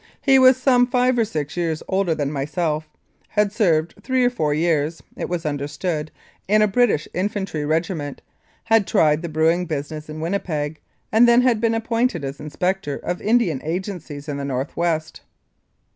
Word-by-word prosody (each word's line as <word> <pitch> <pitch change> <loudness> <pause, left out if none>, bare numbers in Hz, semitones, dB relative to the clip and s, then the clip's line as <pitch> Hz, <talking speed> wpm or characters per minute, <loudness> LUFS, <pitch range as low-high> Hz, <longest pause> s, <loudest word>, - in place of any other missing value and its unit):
He 270 -2 +5
was 255 0 +7
some 250 -1 +4
five 250 0 +2
or 230 - +3
six 150 -8 -4
years 165 -3 -2
older 190 -4 +1
than 145 -2 -2
myself; 155 +2 -2 0.4
had 210 -1 +1
served 170 -6 +1
three 260 -1 +1
or 245 - +3
four 155 -12 -1
years 155 0 0
(it - - -4
was 175 -2 -3
understood) 150 +2 -3 0.4
in 215 +2 +4
a - - +4
British 205 -7 +2
infantry 185 -5 -2
regiment; 160 -2 -2 0.4
had 225 -3 +3
tried 150 0 +3
the 170 - -5
brewing 165 +3 +1
business 155 0 -5
in 155 +1 -6
Winnipeg, 160 -3 -2 0.3
and 225 +2 +6
then 240 +1 +5
had 240 -4 +2
been 230 -1 +2
appointed 230 - 0
an 135 - -3
Inspector 180 +1 -2
of 175 - -3
Indian 210 - +2
Agencies 165 -4 -5
in 145 -2 -3
the 140 - -4
North 135 0 -3
West. 160 -2 -1
170 Hz, 170 wpm, -22 LUFS, 150-215 Hz, 0.4 s, was